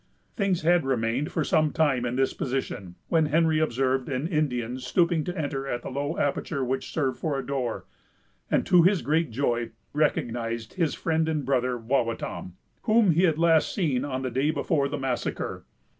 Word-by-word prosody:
Things 195 -6 0
had 175 0 +4
remained 130 +1 0
for - - 0
some 155 -4 +2
time 135 -6 +1
in 120 - -2
this 135 0 +1
position, 125 -9 -4
when 160 -3 +3
Henry 160 +1 +3
observed 130 -3 0
an 135 +3 -1
Indian 130 -7 -1
stooping 165 +5 +1
to 180 +1 -4
enter 140 -3 -3
at 120 -2 -3
the - - -6
low 145 +4 -2
aperture 140 0 -1
which 130 +2 -3
served 135 -5 -1
for 150 -4 -1
a 135 - -4
door, 130 -4 -3 0.6
and, - - +2
to 180 - +6
his 185 +1 +3
great 160 +2 +1
joy, 120 -1 -1 0.2
recognized 115 -6 -1
his 165 -5 0
friend 160 -1 0
and 150 -4 -1
brother, 125 -2 +1
Wawatam, 115 -6 -2 0.3
whom 215 -4 +5
he 170 +4 +4
had 160 -3 +2
last 165 -1 +3
seen 145 - 0
on 135 -2 -3
the 130 - -2
day 135 +5 +1
before 150 -2 0
the 145 - -3
massacre. 130 -3 -3
140 Hz, 180 wpm, -26 LUFS, 125-160 Hz, 0.6 s, to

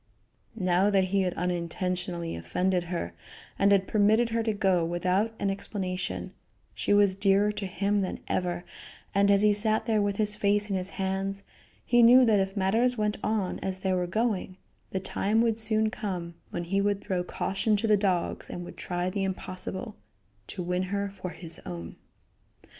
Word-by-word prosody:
Now 185 -1 +2
that 190 -2 +2
he 200 - +4
had 180 -2 -1
unintentionally 180 0 -2
offended 180 - 0
her, 175 0 -4 0.5
and 200 0 +4
had 195 -1 +4
permitted 220 +3 +3
her 230 0 0
to 225 -1 0
go 190 -4 +2
without 180 +6 0
an 195 - 0
explanation, 185 -2 -4 0.4
she - - -2
was 205 -2 +5
dearer 200 +1 +3
to 205 -2 -4
him 200 +3 0
than 185 - -3
ever, 175 -1 -1 0.5
and, 200 0 +3
as 200 0 +4
he 210 -1 +5
sat 215 +1 +1
there 220 -2 +2
with 205 -1 0
his 210 0 +1
face 205 0 +1
in - - +1
his 185 0 -2
hands, 195 +1 -2 0.4
he 240 0 +4
knew 250 +2 +8
that 215 -3 +4
if 195 +1 -2
matters 225 +6 +2
went 210 -1 0
on 215 -4 -1
as 190 -1 -3
they 190 0 -1
were 180 -1 0
going, 200 -2 -1 0.3
the 190 - -2
time 200 +3 0
would 230 -1 +1
soon 220 0 +1
come 180 -7 -4 0.2
when 175 - -4
he 195 +3 0
would 200 0 +1
throw 185 -3 -2
caution 195 +4 0
to 215 - -2
the 215 -1 +5
dogs 190 -4 -1
and 175 - -6
would - - -10
try 175 0 -2
the 195 +1 -1
impossible 190 +2 -3 0.5
to 185 - -5
win 180 +1 -1
her 200 0 -2
for 185 -2 -6
his 170 -2 -5
own. 85 -2 -7
195 Hz, 180 wpm, -28 LUFS, 180-210 Hz, 0.5 s, knew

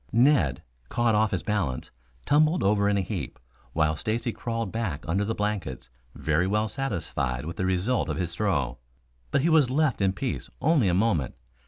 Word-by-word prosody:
Ned, 115 - +3 0.3
caught 120 -1 +2
off 110 0 +3
his 95 - -2
balance, 95 -12 -2 0.3
tumbled 155 +4 +3
over 100 0 +3
in 100 - +2
a - - +2
heap, 90 - -4 0.4
while 80 -1 +2
Stacy 115 +6 -2
crawled 115 -3 -3
back 100 -10 -3
under 95 +5 +1
the 110 +2 -2
blankets, 95 -13 -3 0.2
very 80 +4 +1
well 105 +2 +1
satisfied 80 - -2
with 85 +1 -6
the 95 - 0
result 95 +7 0
of - - -2
his 85 -2 -2
throw. 75 - -1 0.5
But 135 - +2
he 165 - +2
was 155 -6 +5
left 140 -4 +1
in 95 -1 +3
peace 130 +5 -4
only 150 -8 +3
a 90 - +2
moment. 90 - +1
100 Hz, 180 wpm, -27 LUFS, 85-115 Hz, 0.5 s, was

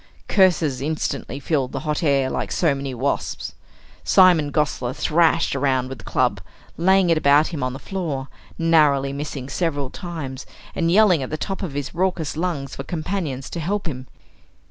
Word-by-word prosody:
Curses 170 -9 +3
instantly 140 -3 -3
filled 140 -2 -1
the - - -3
hot 150 -1 -2
air 140 -4 +2
like - - -3
so 160 -5 +2
many 135 0 -4
wasps. 130 +3 -2 0.5
Simon 175 -6 +5
Gosler 135 -5 0
thrashed 165 -1 +2
around 130 -2 +1
with 135 -3 -7
the - - -12
club - - 0 0.3
laying 190 +1 +3
it 160 - +3
about 145 +1 +4
him 160 -5 -5
on 130 0 -1
the - - -6
floor, 150 -6 -4 0.3
narrowly 150 -5 +3
missing 140 -2 -5
several 145 -2 -2
times, 155 -8 -6 0.3
and 165 -1 0
yelling 190 -5 +5
at 130 - -4
the 155 - -3
top 195 +4 -4
of 180 -8 -4
his 145 0 -4
raucous 175 -4 -1
lungs 155 -5 -3
for 135 - -5
companions 155 -5 -3
to 170 - -4
help 195 +6 -2
him. 130 -5 -5
150 Hz, 170 wpm, -22 LUFS, 135-170 Hz, 0.5 s, Simon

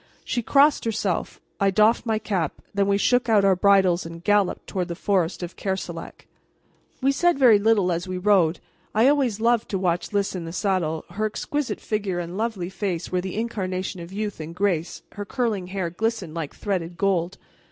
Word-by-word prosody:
She 240 - -1
crossed 285 +5 +4
herself, 210 -5 -2 0.2
I 200 - +3
doffed 215 +5 +3
my 220 -1 +2
cap, 195 -7 -2
then 200 -1 +1
we 200 0 +3
shook 245 +3 +2
out 210 -3 +4
our 195 -1 +5
bridles 190 -2 +4
and 165 0 -9
galloped 205 -1 +2
toward 180 -2 -3
the 170 - -4
forest 185 -2 0
of 175 - -6
Kerselec. 190 -1 -5 0.8
We 270 - +4
said 345 +3 +2
very 240 -6 +6
little 205 -4 +3
as 175 +2 -2
we 185 0 -3
rode. 180 -4 +3 0.4
I 225 +4 +5
always 270 -7 +2
loved 235 0 +2
to 195 - -1
watch 180 -2 -1
Lys 200 -1 0
in 180 -3 -5
the 165 - -7
saddle. 180 -6 -1
Her 215 +4 -1
exquisite 290 +6 -3
figure 205 -4 -2
and 175 0 -4
lovely 210 -5 -2
face 190 -4 -3
were 180 0 +1
the 190 0 -5
incarnation 190 -5 -3
of 170 +1 -9
youth 205 -1 -4
and 160 +2 -7
grace; 180 -4 -1
her 205 - -6
curling 210 -4 -2
hair 185 -2 -3
glistened 210 -4 -2
like 160 -3 -5
threaded 175 -4 -3
gold. 185 -1 0
195 Hz, 190 wpm, -24 LUFS, 180-215 Hz, 0.8 s, very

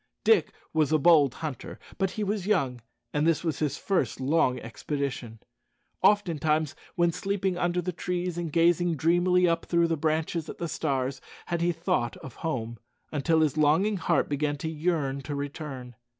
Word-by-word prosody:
Dick 450 - +4 0.2
was 155 -2 +2
a 155 - +5
bold 150 -4 +5
hunter; 145 -5 -6 0.2
but 195 -1 +2
he 215 - -4
was 200 -1 -2
young, 135 - +1 0.3
and 150 +2 +2
this 165 0 +2
was 160 -5 -2
his 150 -3 -1
first 180 - -1
long 130 -2 +2
expedition. 125 0 -4 0.6
Oftentimes, 160 -7 +2 0.2
when 170 -1 +3
sleeping 195 +1 -1
under 175 0 0
the 180 - -2
trees 180 0 -3
and 170 -2 -3
gazing 170 +1 +3
dreamily 175 +3 +3
up 165 0 0
through 170 -1 +3
the 165 - +2
branches 160 +1 -1
at - - -7
the 170 - -3
stars, 135 -4 -2 0.2
had 170 -1 -2
he 175 +1 +2
thought 165 -8 -1
of 130 - -11
home, 120 -8 -3 0.3
until 160 +2 +2
his 155 -1 +1
longing 165 +8 +3
heart 170 - +1
began 145 0 -1
to 160 +3 -4
yearn 150 -4 -1
to 145 +2 -5
return. 140 -3 -6
160 Hz, 170 wpm, -27 LUFS, 140-175 Hz, 0.6 s, a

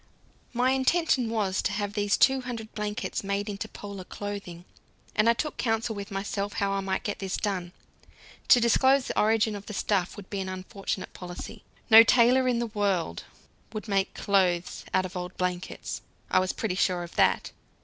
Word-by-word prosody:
My 250 +1 +2
intention 265 -2 +2
was 205 -4 0
to - - -1
have 205 0 -2
these 205 -1 +1
two 265 0 +4
hundred 230 -3 -6
blankets 210 +1 -3
made 200 +1 -2
into 205 +1 -4
Polar 200 -3 -8
clothing, 200 -3 -7 0.5
and 215 +1 +4
I - - +6
took 300 +5 -3
counsel 225 -1 0
with 200 -1 -6
myself 200 +1 -3
how 200 -1 0
I 195 - 0
might 190 -1 -2
get 205 - -3
this 190 -1 -2
done. 185 -4 -2 0.8
To 245 - +7
disclose 260 +3 +4
the - - -1
origin 220 0 +3
of 200 0 -9
the 210 - -6
stuff 190 -1 0
would 200 -2 -9
be 200 - -2
an 190 -1 -3
unfortunate 185 +1 -5
policy. 180 +4 -8 0.3
No 220 +1 +12
tailor 250 +2 +5
in 245 -2 +2
the 235 - 0
world 200 - -1 0.5
would 215 +1 -5
make 195 -1 0
clothes 185 -4 +1
out 185 0 +2
of 185 - -8
old 180 0 -5
blankets, 180 0 -3 0.3
I - - +5
was 185 0 0
pretty 220 -5 -2
sure 180 -1 +1
of 170 - -10
that. - - +3
205 Hz, 185 wpm, -27 LUFS, 190-225 Hz, 0.8 s, No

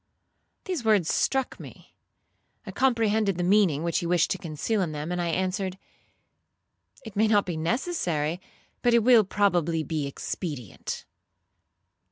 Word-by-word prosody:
These 360 -9 -3
words 210 -7 +3
struck 265 -1 0
me. - - -13 0.7
I - - -6
comprehended 220 -6 +1
the 175 - -1
meaning 180 -5 +3
which 170 0 0
he 170 - -3
wished 175 -1 +2
to 190 - -1
conceal 170 +7 -2
in 165 -4 -2
them, 150 +3 -4
and 180 0 -1
I 170 - -1
answered, 185 +2 -1 1.3
'It 220 - -9
may 215 +2 +3
not 210 -2 +3
be 175 - -3
necessary, 170 - -1 0.4
but 240 -1 +3
it 235 - +4
will 240 -2 +6
probably 175 -5 +1
be 155 -3 -2
expedient.' 140 - -5
185 Hz, 145 wpm, -26 LUFS, 165-220 Hz, 1.3 s, will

